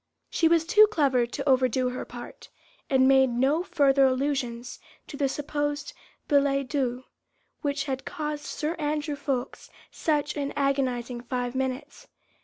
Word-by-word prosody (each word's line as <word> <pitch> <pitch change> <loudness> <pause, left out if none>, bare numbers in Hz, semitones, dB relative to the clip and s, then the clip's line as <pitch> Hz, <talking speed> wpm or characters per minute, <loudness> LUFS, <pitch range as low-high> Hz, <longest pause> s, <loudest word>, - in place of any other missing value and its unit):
She 330 - +3
was 330 -1 +3
too 425 +5 +6
clever 275 - +2
to 240 - -5
overdo 255 -1 +3
her 250 - -5
part, 240 0 -10 0.4
and 260 -1 +4
made 265 -1 +5
no 265 +7 +1
further 285 -6 +3
allusions 255 -2 -2 0.3
to - - -9
the 275 -1 0
supposed 290 - -3 0.3
billet 275 -2 +2
doux, 255 -4 -1 0.6
which 285 -2 -1
had 265 -2 -4
caused 300 -3 -4
Sir 310 +2 -3
Andrew 300 0 -1
Ffoulkes 270 -3 -4 0.2
such 300 -2 -1
an 285 -1 -3
agonising 255 -4 -1
five 245 0 -3
minutes. 265 +2 -4
275 Hz, 140 wpm, -26 LUFS, 255-295 Hz, 0.6 s, too